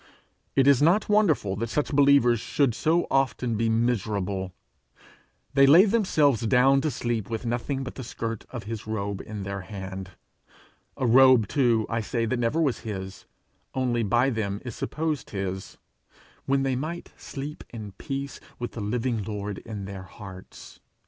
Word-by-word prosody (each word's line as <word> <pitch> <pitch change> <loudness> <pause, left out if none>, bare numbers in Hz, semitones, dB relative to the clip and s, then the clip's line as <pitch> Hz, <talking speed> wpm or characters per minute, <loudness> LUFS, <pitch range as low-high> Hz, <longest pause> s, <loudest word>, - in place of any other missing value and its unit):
It 135 - +4
is 140 -2 +5
not 175 +9 +3
wonderful 165 - +3
that 115 +2 -2
such 150 +4 -1
believers 140 -4 +5
should 135 +2 +1
so 165 +9 +1
often 130 -3 +1
be 115 +1 +1
miserable; 105 -5 0 1.0
they 140 0 +6
lay 170 +8 +8
themselves 160 - +2
down 135 +3 +4
to 155 - 0
sleep 120 -5 -2
with 115 +1 -4
nothing 125 +3 -2
but 130 - -6
the 130 - -7
skirt 115 -1 -5
of 120 -3 -6
his 110 +1 -6
robe 100 -2 -3
in 105 -2 -6
their 100 0 -4
hand 95 -2 -7 0.8
a 130 - -1
robe 125 -2 +6
too, 120 -5 +2
I 115 0 -1
say, 115 +2 -1
that 120 +2 -1
never 120 +7 +1
was 145 -7 +1
his, 95 -3 -6 0.5
only 125 -3 +1
by 120 +5 +2
them 100 -3 -2
is 120 - -5
supposed 155 -2 -3
his 95 -1 -5 0.7
when 135 0 +2
they 135 -1 0
might 160 +6 -5
sleep 145 +1 -7
in 110 -4 -8
peace 140 -1 -5 0.2
with 120 - -4
the 115 - -6
living 115 +2 -1
Lord 105 -1 -4
in 105 -4 -7
their 95 -1 -7
hearts. 95 0 -12
120 Hz, 160 wpm, -26 LUFS, 105-135 Hz, 1.0 s, lay